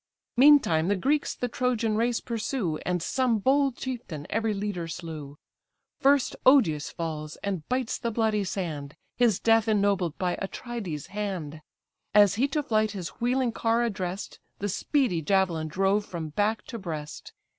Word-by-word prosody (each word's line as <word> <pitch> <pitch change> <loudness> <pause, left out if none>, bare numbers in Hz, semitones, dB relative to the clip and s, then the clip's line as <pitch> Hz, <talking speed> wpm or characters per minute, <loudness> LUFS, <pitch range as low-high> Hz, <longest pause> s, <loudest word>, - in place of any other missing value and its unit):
Meantime, 245 - +6
the 205 - +2
Greeks 285 +9 0
the 245 - -2
Trojan 235 -3 0
race 235 +2 +1
pursue, 220 - -2
And 180 -2 0
some 255 -4 +1
bold 270 +3 +2
chieftain 235 - -5
every 225 0 +1
leader 200 -4 -3
slew: 155 -4 -7 0.6
First 280 -1 +3
Odius 180 - +4
falls, 155 -2 -5
and 190 -6 -3
bites 255 -2 -1
the 235 - -1
bloody 220 -2 +1
sand, 155 -7 -4 0.2
His 235 -6 +3
death 225 -1 +3
ennobled 200 -6 +1
by 180 -1 -1
Atrides' 195 - -5
hand: 185 -7 -4 0.5
As 205 -2 +7
he 245 +7 +2
to 300 +1 -1
flight 215 -3 +1
his 185 -4 -5
wheeling 250 0 +1
car 230 +1 +1
address'd, 190 -4 -4 0.2
The 205 - -3
speedy 220 - +1
javelin 170 -2 +1
drove 195 +5 +1
from 170 -5 -6
back 210 +6 0
to 230 - -7
breast. 155 -6 -6
205 Hz, 150 wpm, -27 LUFS, 170-240 Hz, 0.6 s, As